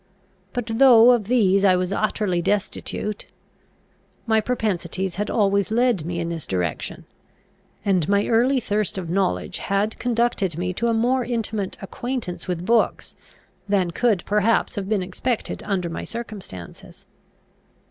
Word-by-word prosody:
But, 245 Hz, -2 st, -3 dB
though 245 Hz, -3 st, +8 dB
of 235 Hz, -4 st, +2 dB
these 200 Hz, -4 st, +3 dB
I 190 Hz, -2 st, +5 dB
was 180 Hz, +1 st, -1 dB
utterly 205 Hz, -4 st, 0 dB
destitute, 205 Hz, +2 st, -2 dB, 1.0 s
my 220 Hz, -1 st, +3 dB
propensities 190 Hz, -6 st, -2 dB
had 210 Hz, +1 st, -2 dB
always 200 Hz, -2 st, +2 dB
led 225 Hz, -7 st, +1 dB
me 170 Hz, -1 st, -3 dB
in 170 Hz, 0 st, -2 dB
this 165 Hz, -3 st, -5 dB
direction; 90 Hz, -5 st, -3 dB, 0.8 s
and 185 Hz, -5 st, +1 dB
my 200 Hz, 0 st, +3 dB
early 250 Hz, +4 st, +3 dB
thirst 210 Hz, -3 st, -1 dB
of 170 Hz, -3 st, -4 dB
knowledge 190 Hz, 0 st, -1 dB
had 200 Hz, +3 st, -1 dB
conducted 230 Hz, -8 st, 0 dB
me 180 Hz, +1 st, -2 dB
to 235 Hz, +6 st, -1 dB
a 230 Hz, -, +2 dB
more 250 Hz, +3 st, +2 dB
intimate 220 Hz, -5 st, -2 dB
acquaintance 240 Hz, -3 st, -5 dB
with 180 Hz, -1 st, -3 dB
books, 230 Hz, +2 st, +1 dB, 0.5 s
than 190 Hz, -4 st, +2 dB
could 215 Hz, -1 st, +1 dB
perhaps 210 Hz, +2 st, +2 dB
have 195 Hz, -1 st, -4 dB
been 210 Hz, -4 st, +1 dB
expected 220 Hz, +6 st, -3 dB
under 190 Hz, -4 st, 0 dB
my 165 Hz, -, -5 dB
circumstances. 205 Hz, -, -9 dB
205 Hz, 140 wpm, -23 LUFS, 185-230 Hz, 1.0 s, though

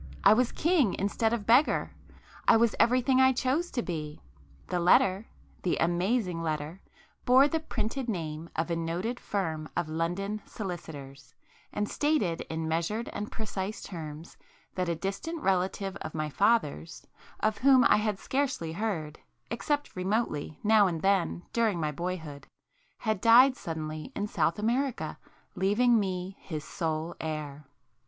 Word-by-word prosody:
—I -, -, +8 dB
was 240 Hz, +2 st, +2 dB
king 315 Hz, -, +2 dB
instead 220 Hz, +3 st, 0 dB
of 230 Hz, -3 st, -2 dB
beggar;—I 235 Hz, -1 st, +1 dB
was 230 Hz, -1 st, +3 dB
everything 255 Hz, +2 st, +4 dB
I 260 Hz, 0 st, +6 dB
chose 270 Hz, +8 st, 0 dB
to 240 Hz, -, -2 dB
be! 155 Hz, -3 st, -5 dB, 0.5 s
The 180 Hz, -, -2 dB
letter,—the 185 Hz, +1 st, +1 dB
amazing 180 Hz, +1 st, 0 dB
letter, 155 Hz, +3 st, -3 dB, 0.4 s
bore 260 Hz, +3 st, +6 dB
the 320 Hz, +2 st, -1 dB
printed 245 Hz, -3 st, -3 dB
name 165 Hz, -4 st, -4 dB
of 165 Hz, +2 st, -1 dB
a -, -, +1 dB
noted 175 Hz, +9 st, -2 dB
firm 160 Hz, -6 st, -3 dB
of 165 Hz, -, 0 dB
London 175 Hz, +6 st, -2 dB
solicitors, 145 Hz, -, -8 dB, 0.4 s
and 210 Hz, 0 st, -1 dB
stated 285 Hz, -, 0 dB
in 160 Hz, 0 st, -3 dB
measured 170 Hz, +8 st, -1 dB
and 210 Hz, +1 st, -5 dB
precise 210 Hz, -2 st, -4 dB
terms 160 Hz, -2 st, -8 dB, 0.4 s
that 180 Hz, -2 st, -1 dB
a 170 Hz, -, 0 dB
distant 195 Hz, -, -4 dB
relative 190 Hz, +1 st, 0 dB
of 155 Hz, -, -7 dB
my 155 Hz, -1 st, -2 dB
father's, 175 Hz, -, +1 dB, 0.3 s
of 215 Hz, 0 st, 0 dB
whom 265 Hz, -1 st, +6 dB
I -, -, +5 dB
had 210 Hz, -1 st, 0 dB
scarcely 260 Hz, -, -2 dB
heard, 165 Hz, -5 st, -3 dB, 0.3 s
except 290 Hz, +5 st, -2 dB
remotely 185 Hz, -6 st, -1 dB
now 215 Hz, -1 st, +5 dB
and 165 Hz, -3 st, -3 dB
then 185 Hz, -, +1 dB
during 225 Hz, -6 st, +1 dB
my 155 Hz, -2 st, -1 dB
boyhood, 160 Hz, -3 st, -5 dB, 0.5 s
had 215 Hz, -4 st, -1 dB
died 250 Hz, +3 st, +7 dB
suddenly 155 Hz, -4 st, -5 dB
in 205 Hz, -, -1 dB
South 165 Hz, -5 st, 0 dB
America, 245 Hz, +5 st, -1 dB, 0.3 s
leaving 225 Hz, +5 st, +3 dB
me 185 Hz, -1 st, -3 dB
his 155 Hz, -4 st, -6 dB
sole 160 Hz, 0 st, -3 dB
heir. 150 Hz, -2 st, -5 dB
190 Hz, 140 wpm, -29 LUFS, 160-230 Hz, 0.5 s, I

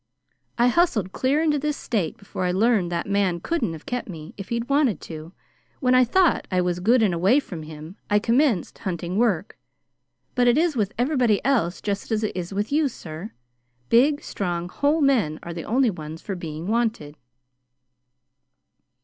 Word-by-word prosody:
I 240 Hz, +1 st, +4 dB
hustled 235 Hz, -, +2 dB
clear 280 Hz, +8 st, +1 dB
into 300 Hz, -2 st, +2 dB
this 300 Hz, +1 st, -2 dB
State 205 Hz, -9 st, -2 dB
before 195 Hz, -2 st, -5 dB
I 180 Hz, -, +1 dB
learned 200 Hz, -2 st, +2 dB
that 170 Hz, -1 st, -2 dB
man 200 Hz, -3 st, +1 dB
couldn't 235 Hz, -, -1 dB
have 160 Hz, -, -10 dB
kept 245 Hz, -3 st, -4 dB
me 160 Hz, -2 st, -8 dB
if 195 Hz, -, -8 dB
he'd 235 Hz, 0 st, -2 dB
wanted 280 Hz, -6 st, +2 dB
to. 160 Hz, 0 st, -8 dB, 0.5 s
When 255 Hz, -3 st, +2 dB
I 255 Hz, 0 st, +6 dB
thought 360 Hz, +7 st, +2 dB
I 185 Hz, -, +1 dB
was 180 Hz, -1 st, 0 dB
good 225 Hz, +6 st, +4 dB
and 195 Hz, -5 st, +2 dB
away 190 Hz, +11 st, +4 dB
from 180 Hz, -, -7 dB
him, 155 Hz, +3 st, -10 dB
I 205 Hz, -, +4 dB
commenced 230 Hz, -, +1 dB
hunting 180 Hz, -1 st, -3 dB
work, 205 Hz, -6 st, 0 dB, 0.7 s
but 245 Hz, -1 st, +2 dB
it 240 Hz, -, +4 dB
is 325 Hz, -1 st, +2 dB
with 210 Hz, -4 st, 0 dB
everybody 245 Hz, -5 st, +2 dB
else 225 Hz, -11 st, +1 dB
just 205 Hz, +2 st, -3 dB
as 220 Hz, 0 st, 0 dB
it 215 Hz, -, -2 dB
is 180 Hz, 0 st, -4 dB
with 205 Hz, +4 st, -2 dB
you, 300 Hz, 0 st, +3 dB
sir. 175 Hz, -, -8 dB, 0.6 s
Big, 285 Hz, +5 st, +4 dB
strong, 175 Hz, -3 st, -3 dB
whole 290 Hz, -, +1 dB
men 230 Hz, -, +2 dB
are 170 Hz, -, -6 dB
the 165 Hz, -1 st, -6 dB
only 250 Hz, 0 st, +2 dB
ones 160 Hz, -2 st, -8 dB
for 200 Hz, -, -5 dB
being 160 Hz, -2 st, -6 dB
wanted." 220 Hz, -9 st, -1 dB
210 Hz, 180 wpm, -24 LUFS, 175-255 Hz, 0.7 s, I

